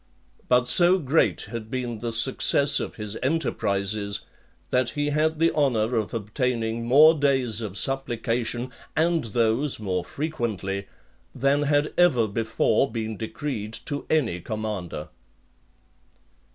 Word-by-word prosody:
But 125 0 +4
so 175 +6 +6
great 160 -1 +1
had 115 -2 -6
been 125 -3 -4
the 120 0 -3
success 135 +4 +3
of - - -5
his 105 -1 -5
enterprises, 100 -8 -1 0.5
that 125 -1 +2
he 145 0 -2
had 155 +2 +1
the 165 +1 +3
honour 125 -6 +1
of 110 -2 -1
obtaining 115 +1 -2
more 150 +6 +7
days 135 -7 +1
(17) 115 - -3
of 100 0 -7
supplication, 120 -2 -1 0.2
and 165 -2 +1
those 115 +5 0
more 95 -4 -2
frequently, 105 - -3 0.5
than 140 +3 +2
had 145 0 +1
ever 130 -11 +4
before 110 +3 +1
been 110 -1 -3
decreed 110 -1 -5
to 145 -2 -4
any 125 - +1
commander. 105 -7 -5
120 Hz, 125 wpm, -25 LUFS, 110-145 Hz, 0.5 s, more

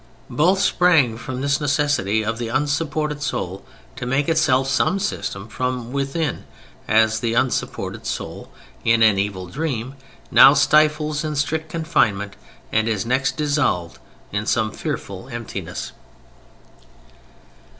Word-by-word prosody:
Both 185 +6 +3
sprang 165 - +3
from 125 +3 -6
this 140 +1 +1
necessity 140 - +1
of 115 +1 -2
the 120 - -3
unsupported 150 +3 -1
soul 95 -9 -3 0.3
to 125 - -4
make 135 +3 +1
itself 135 -5 +2
some 135 +8 +2
system 115 - -3
from 125 0 -3
within: 140 +2 -2 0.4
as 110 0 +3
the 115 -1 -1
unsupported 130 +1 -1
soul, - - -5 0.3
in 115 0 +4
an 105 -3 +5
evil 100 -2 -2
dream, 130 - -3 0.4
now 140 - +8
stifles 150 +1 +3
in 155 -1 -3
strict 160 +2 -1
confinement 110 -12 0 0.4
and 110 +1 +1
is 110 -1 -1
next 130 +2 0
dissolved 145 - 0 0.3
in 105 +2 -3
some 110 -2 +1
fearful 100 +4 -5
emptiness. 120 -2 -6
130 Hz, 125 wpm, -21 LUFS, 110-150 Hz, 0.4 s, now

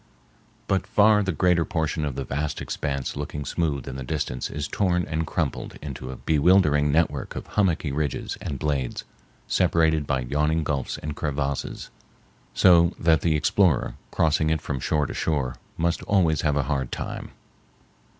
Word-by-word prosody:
But 95 0 0
far 105 0 +5
the 95 -2 0
greater 85 +1 +2
portion 80 -1 -1
of 70 -3 -3
the 70 - -3
vast 75 +4 -3
expanse 70 -2 -3
looking 75 0 -5
smooth 75 -6 -1
in 65 - -5
the 65 - -5
distance 65 -2 -3
is 75 0 -4
torn 90 -1 +1
and 80 0 -2
crumpled - - -3
into 65 -3 -7
a 65 - -5
bewildering 75 -1 +3
network 80 +2 0
of - - -5
hummocky 85 -7 0
ridges 70 -1 -2
and 70 - -4
blades, 70 -4 -2 0.4
separated 80 -4 +2
by 65 -2 0
yawning 75 +5 0
gulfs 70 -3 -2
and 75 -1 -5
crevasses, 70 -2 -3 0.6
so 85 -2 +5
that 80 -1 +3
the 80 -2 +2
explorer, 80 0 +2 0.2
crossing 80 0 +2
it 80 0 +1
from 70 -2 -4
shore 75 +3 +1
to - - -5
shore, 70 -6 -1 0.2
must 85 +1 0
always 85 -6 +2
have 75 -2 +1
a 75 - +2
hard 65 -3 -2
time. - - -5
75 Hz, 160 wpm, -25 LUFS, 70-85 Hz, 0.6 s, far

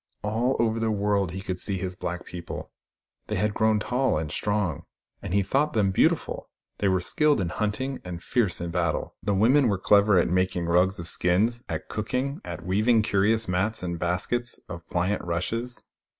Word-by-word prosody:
All 115 +5 +1
over 115 -1 +1
the 115 0 0
world 100 -2 +1
he 95 +3 -6
could 90 -1 -4
see 100 -2 -1
his 90 0 -4
black 90 0 -4
people. 85 -1 -7 0.6
They - - -2
had 105 0 0
grown 110 -1 +2
tall 125 0 +1
and 75 -1 -3
strong, 105 -8 -1 0.4
and - - -6
he 100 +1 +3
thought 145 +9 +1
them 105 -4 +2
beautiful. - - +1 0.3
They 100 - +2
were 95 -1 +3
skilled 150 - +2
in 90 -3 -1
hunting, 115 +8 -2
and 90 -1 -7
fierce 115 -7 +1
in 85 0 -4
battle: 85 0 -1
the 100 - 0
women 125 +7 +4
were 100 -3 +1
clever 100 +1 +4
at 85 - +4
making 90 -1 0
rugs 90 +3 +3
of 85 - -6
skins, 105 +9 +1
at - - -4
cooking, 130 - -2
at 85 - -7
weaving 110 +4 +3
curious 110 +3 +2
mats 95 +4 -1
and 85 -2 -3
baskets 110 +8 -1
of 85 -1 -7
phant 90 +4 0
rushes. 115 +9 -3
100 Hz, 185 wpm, -26 LUFS, 90-115 Hz, 0.6 s, women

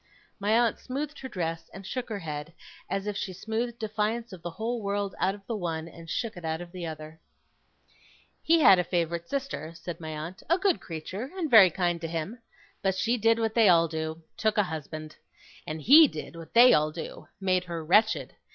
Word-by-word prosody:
My 210 +3 +2
aunt 235 -2 +1
smoothed 285 +3 -5
her 260 - -7
dress 165 -6 -4
and 195 0 -9
shook 250 +5 -4
her 215 - -3
head, 155 -2 -6 0.4
as 195 0 -2
if 210 -1 -3
she 190 - -4
smoothed 225 +5 -3
defiance 220 +1 -2
of 180 - -10
the 175 - -4
whole 225 +7 -3
world 200 -1 -2
out 190 +2 +1
of 200 -1 -16
the 230 - -3
one, 165 -5 -3
and 165 0 -12
shook 230 +3 -2
it 175 - -10
out 160 0 -2
of 175 -1 -9
the 175 -2 -5
other. 155 0 -8 1.2
'He 330 0 +4
had 195 -9 +8
a - - +2
favourite 170 -1 -2
sister,' 265 - -4
said 170 0 -7
my 160 -1 -6
aunt, 155 +4 -6
'a 340 - +4
good 380 -2 +1
creature, 185 - -6
and 325 -6 -2
very 210 -5 +9
kind 175 -1 -1
to 165 - -3
him. 165 +8 -4 0.4
But 190 -1 +1
she 230 +5 +1
did 225 0 +3
what 225 -1 0
they 225 -4 +5
all 170 -1 +5
do 160 0 -4
took 220 -1 +1
a 210 - +5
husband. 155 -2 -7 0.5
And 155 -2 -5
HE 300 +5 +9
did 155 - -8
what 165 +2 -11
they 245 +2 +9
all 155 0 +3
do 160 +1 -8
made 185 -2 +1
her 170 -2 -5
wretched. 215 +7 +3
185 Hz, 210 wpm, -28 LUFS, 165-225 Hz, 1.2 s, very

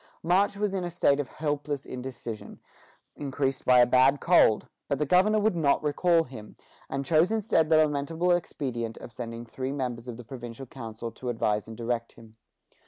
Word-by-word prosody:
March 195 +4 +2
was 205 -1 -1
in 190 -2 -1
a 175 - -3
state 145 -4 +2
of 145 - -2
helpless 145 -1 -3
indecision, 125 -3 -7 0.6
increased 135 -1 -2
by 125 -1 +6
a - - +7
bad 130 +3 +4
cold; 170 -11 +4 0.2
but 140 - 0
the 150 - 0
governor 185 +8 +4
would 215 -2 +2
not 150 -4 +2
recall 165 +3 +3
him, 115 -7 -11 0.3
and 135 0 -3
chose 160 +7 +3
instead 205 -8 +2
the 160 - +5
lamentable 155 +3 +1
expedient 125 -9 -2
of - - -10
sending 115 0 -7
three 130 +3 -4
members 125 -4 -4
of 120 -2 -6
the 125 - -9
provincial 120 +1 -8
council 115 -2 -7
to 125 +2 -6
advise 105 -3 0
and 110 -1 -9
direct 115 0 -3
him. 110 -1 -16
135 Hz, 180 wpm, -27 LUFS, 120-160 Hz, 0.6 s, a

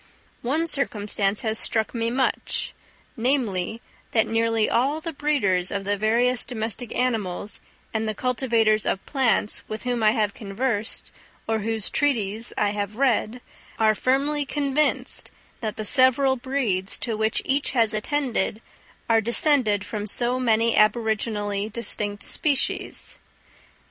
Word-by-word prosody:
One 295 +7 0
circumstance 210 -9 -1
has 220 -1 0
struck 220 -1 +2
me 230 -1 -1
much; 260 +2 -1 0.4
namely, 230 -5 0 0.3
that 220 - +4
nearly 225 -1 +1
all 275 +6 +1
the 330 0 -5
breeders 225 -12 +1
of 200 -1 -3
the 205 +1 0
various 235 +4 +2
domestic 225 0 -4
animals 210 -5 -2 0.3
and 220 0 -1
the 215 - -3
cultivators 230 -3 +1
of 195 - -1
plants, 255 -6 +1
with 215 +1 -6
whom 245 -2 -1
I 215 - +5
have 215 -3 +1
conversed, 215 +1 -2 0.4
or 220 0 0
whose 220 0 -2
treatises 230 -6 0
I 205 - +2
have 205 0 -3
read, 245 -2 +1 0.4
are 220 -1 +4
firmly 280 +6 +1
convinced 285 +1 -1 0.3
that 220 -4 -3
the 215 - -4
several 265 +2 +4
breeds 240 -8 -1
to 230 -3 -2
which 220 +1 +1
each 275 +1 +1
has 230 -4 +3
attended, 230 -2 0 0.5
are 225 -1 +4
descended 235 -3 +3
from 210 -1 -4
so 245 +4 0
many 230 -2 +2
aboriginally 215 -2 +1
distinct 205 -2 -3
species. 285 -3 0
225 Hz, 135 wpm, -24 LUFS, 210-255 Hz, 0.5 s, I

